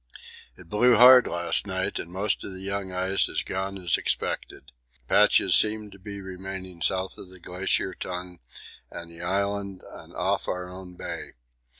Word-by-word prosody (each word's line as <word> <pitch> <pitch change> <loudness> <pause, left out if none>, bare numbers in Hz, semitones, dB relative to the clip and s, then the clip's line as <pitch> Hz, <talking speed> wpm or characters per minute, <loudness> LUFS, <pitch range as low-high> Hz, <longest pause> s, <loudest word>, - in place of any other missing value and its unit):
It 95 - -15
blew 115 +6 +4
hard 125 +2 +9
last 85 +3 +1
night 95 -1 -2
and 85 - -7
most 100 +3 -1
of 95 - -7
the 95 - -9
young 100 -1 -4
ice 95 +1 +1
has - - -2
gone 95 +1 -4
as 90 -3 +1
expected. - - -3 0.4
Patches 105 -3 +5
seem 105 -1 +2
to 100 - -14
be 100 +1 -8
remaining 95 -1 -7
south 95 +2 -1
of 95 - -10
the 95 0 -12
Glacier 90 +1 -1
Tongue 90 -1 -6 0.5
and 85 0 -9
the 85 0 -10
Island 100 +1 -2
and - - -12
off - - -1
our 90 0 -3
own 90 0 -10
bay. - - -5
95 Hz, 170 wpm, -26 LUFS, 90-100 Hz, 0.5 s, hard